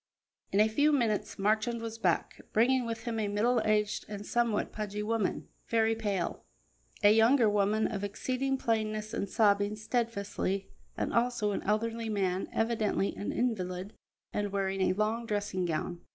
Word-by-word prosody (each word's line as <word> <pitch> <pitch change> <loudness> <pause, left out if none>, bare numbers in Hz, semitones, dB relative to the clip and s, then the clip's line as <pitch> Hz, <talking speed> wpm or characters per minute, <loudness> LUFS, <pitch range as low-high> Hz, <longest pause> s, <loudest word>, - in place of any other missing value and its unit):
In 195 - +2
a 215 - +6
few 290 +8 +3
minutes 230 -7 0
Marchand 215 +4 +1
was 225 0 -6
back, - - 0
bringing 245 +2 +3
with 225 -1 -4
him 230 -2 -2
a 210 - 0
middle 225 +4 +2
aged 210 -1 +1
and 205 -1 -6
somewhat 235 -2 0
pudgy 210 -1 -4
woman, 220 -2 -1 0.2
very 225 -1 +2
pale; 205 -6 -2 0.6
a 205 +1 +8
younger 225 +2 +5
woman 210 +1 +2
of 205 -3 -2
exceeding 260 +6 -1
plainness, 215 -2 -1
and 200 - -2
sobbing 205 -1 +3
steadfastly; 210 -4 -2 0.3
and - - -2
also 235 -3 +1
an - - -2
elderly 225 +2 -1
man, 190 -3 -1
evidently 225 -3 0
an 205 - -3
invalid, 195 -4 -2 0.4
and 205 -1 -1
wearing 195 -1 -1
a 185 - +3
long 220 +4 -1
dressing 205 -4 -1
gown. 170 +1 -3
215 Hz, 155 wpm, -30 LUFS, 205-230 Hz, 0.6 s, a